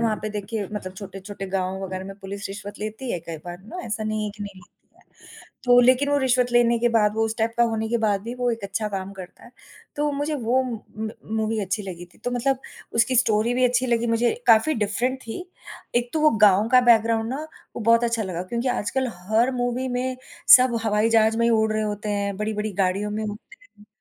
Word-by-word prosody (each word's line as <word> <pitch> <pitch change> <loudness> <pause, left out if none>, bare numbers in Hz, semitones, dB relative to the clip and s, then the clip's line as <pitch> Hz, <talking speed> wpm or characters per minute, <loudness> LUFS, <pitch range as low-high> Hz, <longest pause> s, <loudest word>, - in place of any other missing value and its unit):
वहाँ 225 -2 +1
पे 215 - -2
देखिए 210 0 -4
मतलब 185 -3 -5
छोटे-छोटे 195 0 -8
गाँव 190 0 -2
वग़ैरह 185 0 -5
में 195 - -8
पुलिस 200 +1 -6
रिश्वत 205 +1 -8
लेती 215 +4 -5
है 175 - -1
कई 165 0 -7
बार 175 0 -7
ना, 220 - -10
ऐसा 215 0 -3
नहीं 215 0 -1
है 210 - -3
कि 205 - -7
नहीं 200 -1 -7
लेती 180 - -25
है, - - -24 0.6
तो 245 0 +6
लेकिन 255 +3 +4
वो 285 - +3
रिश्वत 250 -2 +1
लेने 235 -1 +4
के 240 +1 +2
बाद, 215 -3 +2
वो 225 0 +1
उस 220 0 -3
टाइप 225 +1 0
का 240 - +4
होने 220 0 -2
के 235 +1 +1
बाद 210 -3 +1
भी, 235 +3 -5
वो 245 -1 0
एक 230 -3 -4
अच्छा 210 +2 -2
काम 195 -1 -5
करता 185 -2 -11
है, 235 - -14 0.5
तो 295 0 +1
मुझे 290 +2 -2
वो 255 -1 +1
म 240 -3 -4 0.2
म 220 0 -3 0.3
मूवी 220 0 0
अच्छी 195 +1 -2
लगी 180 -3 -7
थी, - - -22
तो 245 - -4
मतलब 255 +2 0 0.4
उसकी 235 +3 +2
स्टोरी 230 0 +2
भी 255 +1 +2
अच्छी 250 +1 +2
लगी 235 -1 +1
मुझे, 230 +1 +2 0.2
काफ़ी 230 +7 +5
डिफरेंट 230 +5 -1
थी, 230 +10 -6 0.5
एक 240 0 0
तो 315 - 0
वो 305 0 +6 0.2
गाँव 205 +3 +3
का 255 - +8
बैकग्राउंड 225 0 +3
ना 280 +4 -3 0.3
वो - - -4
बहुत 230 +2 +4
अच्छा 230 -1 0
लगा, 180 -3 -4
क्योंकि 235 +7 -2
आजकल 250 +2 -1 0.2
हर 230 +4 +3
मूवी 245 +1 -1
में 255 +1 -2 0.4
सब 250 -2 +1
हवाई 215 +1 +2
जहाज 225 0 +4
में 235 - +2
ही - - +3
उड़ 220 -1 +2
रहे 215 0 0
होते 210 0 -3
हैं, 200 -1 -1
बड़ी-बड़ी 215 0 -2
गाड़ियों 195 +3 0
में 215 +1 -3
घूमते 215 - -10
हैं। 210 - -17
225 Hz, 230 wpm, -24 LUFS, 205-245 Hz, 0.6 s, का